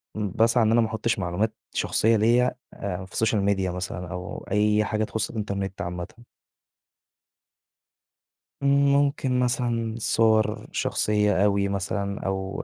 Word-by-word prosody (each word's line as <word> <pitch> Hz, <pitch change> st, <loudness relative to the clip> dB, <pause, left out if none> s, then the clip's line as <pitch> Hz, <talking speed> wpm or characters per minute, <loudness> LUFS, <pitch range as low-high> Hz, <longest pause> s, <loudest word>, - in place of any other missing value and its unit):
باسعى 110 Hz, +3 st, +2 dB
إن 110 Hz, -, +2 dB
أنا 120 Hz, 0 st, +4 dB
ما 110 Hz, -, +1 dB
أحُطِّش 110 Hz, 0 st, -1 dB
معلومات 90 Hz, +5 st, -1 dB, 0.2 s
شخصيّة 115 Hz, +1 st, +2 dB
ليَّ 115 Hz, +3 st, +4 dB, 0.3 s
آآ 95 Hz, -1 st, -5 dB
في 95 Hz, -, -19 dB
السوشيال 110 Hz, -2 st, +1 dB
ميديا 95 Hz, -2 st, 0 dB
مثلًا، 90 Hz, 0 st, -5 dB
أو 90 Hz, 0 st, -6 dB
أي 105 Hz, +1 st, +3 dB
حاجة 110 Hz, +1 st, -1 dB
تخُصّ 110 Hz, +1 st, -2 dB
الإنترنت 100 Hz, -3 st, -4 dB
عامةً. 90 Hz, 0 st, -4 dB, 2.6 s
امم. 140 Hz, 0 st, +4 dB
ممكن 140 Hz, -2 st, +1 dB
مثلًا 120 Hz, -3 st, 0 dB
صور 110 Hz, -1 st, +2 dB
شخصيَّة 105 Hz, -2 st, +1 dB
أوي 100 Hz, -1 st, +2 dB
مثلًا، 100 Hz, +1 st, -2 dB
أو 95 Hz, 0 st, -3 dB
105 Hz, 130 wpm, -25 LUFS, 95-115 Hz, 2.6 s, أنا